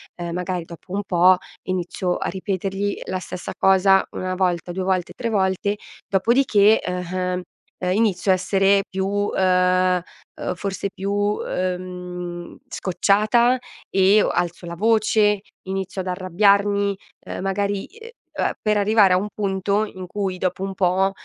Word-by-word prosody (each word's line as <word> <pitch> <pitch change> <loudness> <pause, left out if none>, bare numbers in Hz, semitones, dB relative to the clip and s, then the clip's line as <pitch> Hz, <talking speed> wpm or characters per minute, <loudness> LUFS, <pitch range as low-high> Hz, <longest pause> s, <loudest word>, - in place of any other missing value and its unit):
ehm, 170 -1 -5
magari 180 0 -2
dopo 170 +2 -13
un 200 - 0
po' 180 0 +5 0.3
inizio 180 0 -2
a - - -3
ripetergli 195 +1 -2
la 185 - -3
stessa 180 0 -7
cosa 190 0 +4
una 185 0 -3
volta, 180 -2 0
due 185 +2 -3
volte, 185 -2 -1
tre 235 -2 -3
volte 200 0 0 0.3
dopodiché, 215 0 +4
eh 180 0 -3
ehm, 180 0 -1 0.4
e 180 0 +1
inizio 205 -3 +1
a - - +6
essere 195 +1 +2
più, 200 +2 -1
ehm 185 -1 +3 0.4
o - - -2
forse 195 +2 -3
più, 205 +2 -1
ehm, 180 -1 -4
scocciata 215 +7 +2 0.3
e 195 +2 +5
o - - +1
alzo 175 0 -2
la 170 - -5
voce, 215 0 +3 0.3
inizio 190 0 -3
ad 185 - -7
arrabbiarmi, 200 +2 +2 0.3
ehm, - - -5
magari, 200 +1 -1
ehm 455 +2 -13 0.2
a - - -1
per 215 -1 +1
arrivare 205 -1 +4
a 180 - +5
un 200 +3 -2
punto 200 0 0
in 185 -4 -7
cui 190 -1 -3
dopo 185 +1 -2
un 195 0 -3
po', 190 +1 +2
190 Hz, 150 wpm, -22 LUFS, 180-205 Hz, 0.4 s, a